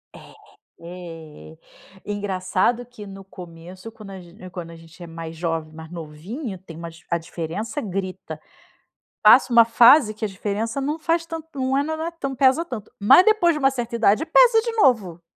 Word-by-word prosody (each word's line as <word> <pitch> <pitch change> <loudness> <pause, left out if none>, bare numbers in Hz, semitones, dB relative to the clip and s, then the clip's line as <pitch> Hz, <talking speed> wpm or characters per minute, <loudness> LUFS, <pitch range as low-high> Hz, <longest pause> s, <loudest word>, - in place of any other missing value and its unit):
É, - - -13 0.5
eh, 165 -3 -11 0.5
engraçado 205 +3 -1
que, 240 -3 -12
no 195 -1 -11
começo, 180 +2 -11
quando 215 -3 -12
a 190 - -9
gen 180 +1 -13
quando 175 -2 -8
a - - -11
gente 165 +2 -17
é - - -9
mais 165 0 -8
jovem, 165 -2 -4
mais 160 0 -11
novinho, 175 - -7
tem 170 -3 -12
uma 170 0 -7 0.2
a 170 - +1
diferença 170 - -5
grita. 185 - -6 0.8
Passa 240 +3 +6
uma 230 -1 +7
fase 235 +1 +6
que 215 - -4
a - - -1
diferença 210 +6 -4
não 295 +3 -2
faz 330 +1 0
tanto 325 -1 -7
não 260 +1 0
é 280 - +1
mas 315 +1 -4
não 320 - -4
é 335 - -4
tan 330 -5 -5
não 270 - -6
pesa 265 +6 +3
tanto. 235 -9 -8
Mas 260 - +7
depois 430 -6 +3
de 300 - -4
uma 270 -2 +4
certa 240 -3 -4
idade 225 +5 +2
pesa 470 +3 +5
de 465 +1 -3
novo. 220 - +1
205 Hz, 190 wpm, -22 LUFS, 170-265 Hz, 0.8 s, uma